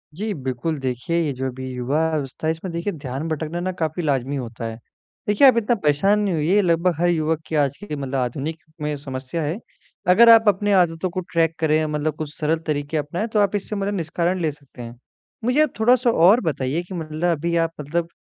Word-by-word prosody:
जी 210 Hz, +2 st, -3 dB
बिल्कुल, 135 Hz, +2 st, -3 dB
देखिए 130 Hz, +6 st, -2 dB
ये 150 Hz, -3 st, 0 dB
जो 130 Hz, +1 st, -3 dB
भी 130 Hz, 0 st, -7 dB
युवा-अवस्था 145 Hz, +3 st, -1 dB
है 160 Hz, -, +3 dB
इसमें 165 Hz, +3 st, -5 dB
देखिए 175 Hz, +4 st, -2 dB
ध्यान 140 Hz, +1 st, -5 dB
भटकना 160 Hz, +2 st, -3 dB
ना 185 Hz, +1 st, -2 dB
काफ़ी 160 Hz, +2 st, -1 dB
लाज़मी 140 Hz, -1 st, 0 dB
होता 115 Hz, -3 st, -5 dB
है, 115 Hz, 0 st, -5 dB, 0.5 s
देखिए 210 Hz, +7 st, +6 dB
आप 250 Hz, -3 st, +6 dB
इतना 235 Hz, +1 st, +2 dB
परेशान 195 Hz, +8 st, +3 dB
नहीं 200 Hz, -4 st, 0 dB
होइए 170 Hz, +7 st, +2 dB
लगभग 170 Hz, 0 st, +2 dB
हर 175 Hz, 0 st, +3 dB
युवक 160 Hz, -1 st, 0 dB
की 160 Hz, -, -3 dB
आज 140 Hz, -2 st, +2 dB
की 150 Hz, -7 st, -5 dB
मतलब 135 Hz, -1 st, -4 dB
आधुनिक 140 Hz, +6 st, -3 dB, 0.2 s
में 150 Hz, 0 st, -1 dB
समस्या 135 Hz, +3 st, -5 dB
है। 160 Hz, +9 st, -2 dB, 0.5 s
अगर 230 Hz, +6 st, +7 dB
आप 225 Hz, -1 st, +7 dB
अपनी 205 Hz, +1 st, +3 dB
आदतों 180 Hz, -1 st, +2 dB
को 185 Hz, +2 st, -4 dB
ट्रैक 165 Hz, -1 st, +2 dB
करें 155 Hz, 0 st, +2 dB
मतलब 150 Hz, 0 st, -2 dB
कुछ 155 Hz, -1 st, -5 dB
सरल 160 Hz, +1 st, 0 dB
तरीक़े 145 Hz, +1 st, -1 dB
अपनाएँ 160 Hz, +9 st, -2 dB
तो 210 Hz, -, +3 dB
आप 205 Hz, 0 st, +2 dB
इससे 205 Hz, +1 st, -3 dB
मतलब 200 Hz, 0 st, -1 dB
निष्कारण 170 Hz, +2 st, -1 dB
ले 155 Hz, -2 st, +1 dB
सकते 140 Hz, -3 st, -15 dB
हैं, 120 Hz, 0 st, -8 dB, 0.5 s
मुझे 255 Hz, +5 st, +3 dB
आप 300 Hz, -, -1 dB
थोड़ा-सा 245 Hz, +2 st, +4 dB
और 195 Hz, +6 st, +5 dB
बताइए 150 Hz, -2 st, -1 dB
कि 185 Hz, -, -10 dB
मतलब 160 Hz, 0 st, -1 dB
अभी 170 Hz, +3 st, -1 dB
आप 165 Hz, -1 st, +1 dB
मतलब 165 Hz, +4 st, -2 dB
160 Hz, 210 wpm, -22 LUFS, 145-185 Hz, 0.5 s, अगर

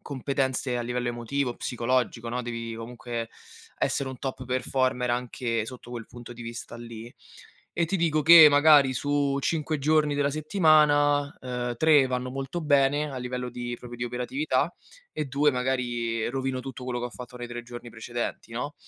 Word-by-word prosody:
competenze 130 Hz, -2 st, -2 dB
a -, -, -2 dB
livello 120 Hz, 0 st, -2 dB
emotivo, 120 Hz, +2 st, -2 dB
psicologico, 120 Hz, -1 st, -1 dB
no. 125 Hz, +1 st, -2 dB
Devi 115 Hz, -1 st, -5 dB
comunque 115 Hz, 0 st, -6 dB, 0.5 s
essere 140 Hz, -, 0 dB
un 130 Hz, -, -7 dB
top 130 Hz, -1 st, -5 dB
performer 130 Hz, -1 st, 0 dB
anche 120 Hz, -2 st, -2 dB
sotto 125 Hz, -1 st, -10 dB
quel 115 Hz, -2 st, -6 dB
punto 120 Hz, 0 st, -11 dB
di 120 Hz, -, -12 dB
vista 115 Hz, 0 st, -7 dB
lì. 115 Hz, 0 st, -9 dB, 0.6 s
E 170 Hz, -, +1 dB
ti 195 Hz, +4 st, 0 dB
dico 155 Hz, -3 st, +1 dB
che 160 Hz, -1 st, +10 dB
magari 145 Hz, -2 st, +6 dB
su 140 Hz, +1 st, 0 dB
5 155 Hz, 0 st, -1 dB
giorni 150 Hz, +1 st, +2 dB
della 145 Hz, 0 st, +2 dB
settimana, 150 Hz, -3 st, +3 dB
ehm, 125 Hz, -1 st, -3 dB
3 150 Hz, -3 st, +5 dB
vanno 125 Hz, 0 st, -2 dB
molto 135 Hz, +6 st, -4 dB
bene, 145 Hz, 0 st, +2 dB
a -, -, -6 dB
livello 125 Hz, 0 st, -4 dB
di 120 Hz, 0 st, -5 dB
proprio 120 Hz, -1 st, -9 dB
di 120 Hz, -, -2 dB
operatività, 130 Hz, +5 st, -1 dB, 0.4 s
e 150 Hz, -, -3 dB
2 140 Hz, +3 st, +2 dB
magari 120 Hz, -3 st, -1 dB
rovino 130 Hz, +1 st, -2 dB
tutto 130 Hz, -1 st, -8 dB
quello 125 Hz, -1 st, -2 dB
che 120 Hz, -, -4 dB
ho -, -, -9 dB
fatto 125 Hz, +1 st, -10 dB
nei 120 Hz, 0 st, -6 dB
3 120 Hz, 0 st, -6 dB
giorni 120 Hz, 0 st, -9 dB
precedenti, 120 Hz, +1 st, -5 dB
no. 145 Hz, +6 st, -4 dB
125 Hz, 170 wpm, -27 LUFS, 120-145 Hz, 0.6 s, che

